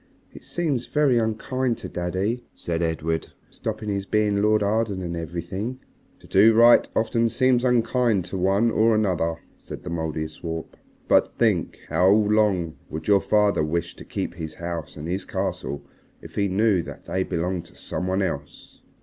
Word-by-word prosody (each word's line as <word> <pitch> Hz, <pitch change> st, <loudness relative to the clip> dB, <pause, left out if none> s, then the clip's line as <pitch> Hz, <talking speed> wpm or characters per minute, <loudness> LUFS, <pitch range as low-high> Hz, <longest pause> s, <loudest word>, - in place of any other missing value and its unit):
"It -, -, -12 dB
seems 145 Hz, -8 st, -2 dB
very 145 Hz, -5 st, +3 dB
unkind 115 Hz, +3 st, -1 dB
to -, -, -7 dB
daddy," 95 Hz, +7 st, -2 dB
said 85 Hz, -1 st, -3 dB
Edred, 80 Hz, -1 st, -1 dB, 0.2 s
"stopping 105 Hz, -, -4 dB
his 100 Hz, -1 st, -2 dB
being 105 Hz, -1 st, +2 dB
Lord 105 Hz, 0 st, +3 dB
Arden 105 Hz, -2 st, 0 dB
and 85 Hz, -1 st, -3 dB
everything." 85 Hz, +9 st, -4 dB, 0.4 s
"To -, -, -16 dB
do 110 Hz, +4 st, +5 dB
right 120 Hz, +1 st, +6 dB
often 115 Hz, +1 st, +2 dB
seems 125 Hz, +1 st, +2 dB
unkind 120 Hz, -5 st, +2 dB
to 95 Hz, -, -5 dB
one 100 Hz, +5 st, +3 dB
or 110 Hz, 0 st, +3 dB
another," 90 Hz, -6 st, +1 dB, 0.2 s
said -, -, -9 dB
the 90 Hz, -, -6 dB
Mouldiestwarp, 80 Hz, 0 st, -4 dB, 0.3 s
"but -, -, +3 dB
think. -, -, +1 dB
How 90 Hz, +1 st, +4 dB
long 105 Hz, -5 st, +2 dB
would 80 Hz, 0 st, -6 dB
your 100 Hz, -1 st, +5 dB
father 105 Hz, -6 st, +2 dB
wish 80 Hz, +2 st, -2 dB
to -, -, -9 dB
keep -, -, -4 dB
his 80 Hz, -3 st, -7 dB
house 85 Hz, -4 st, -5 dB
and 75 Hz, +2 st, -6 dB
his 90 Hz, +2 st, -2 dB
castle 70 Hz, -, -3 dB, 0.4 s
if -, -, -12 dB
he 100 Hz, -1 st, +1 dB
knew 100 Hz, 0 st, +2 dB
that -, -, -10 dB
they 95 Hz, -, -1 dB
belonged 90 Hz, -1 st, -2 dB
to -, -, -17 dB
some 90 Hz, -, -4 dB
one 95 Hz, +1 st, +1 dB
else?" 70 Hz, -6 st, -6 dB
100 Hz, 165 wpm, -24 LUFS, 85-110 Hz, 0.4 s, right